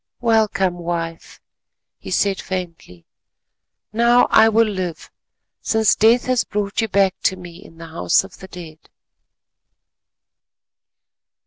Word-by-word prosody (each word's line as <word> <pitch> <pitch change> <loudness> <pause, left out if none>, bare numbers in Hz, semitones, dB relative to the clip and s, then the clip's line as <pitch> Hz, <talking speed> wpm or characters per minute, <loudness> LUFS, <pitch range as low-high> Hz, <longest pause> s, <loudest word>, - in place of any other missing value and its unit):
"Welcome, 210 -6 +1
wife," 165 -1 -5 0.6
he - - -10
said 200 -1 0
faintly, 170 - -7 0.9
"now 235 +2 +4
I 220 0 +6
will 225 +1 +3
live 185 -5 -5 0.5
since 220 -1 +2
Death 230 +3 +3
has 255 -1 +1
brought 205 +1 -3
you 225 - -1
back 195 -2 +2
to 190 - +1
me 175 -2 -11
in 165 - -16
the 165 - -10
House 125 - +1
of 195 -1 -14
the 190 - -11
Dead." 165 -4 -11
190 Hz, 120 wpm, -20 LUFS, 170-220 Hz, 0.9 s, I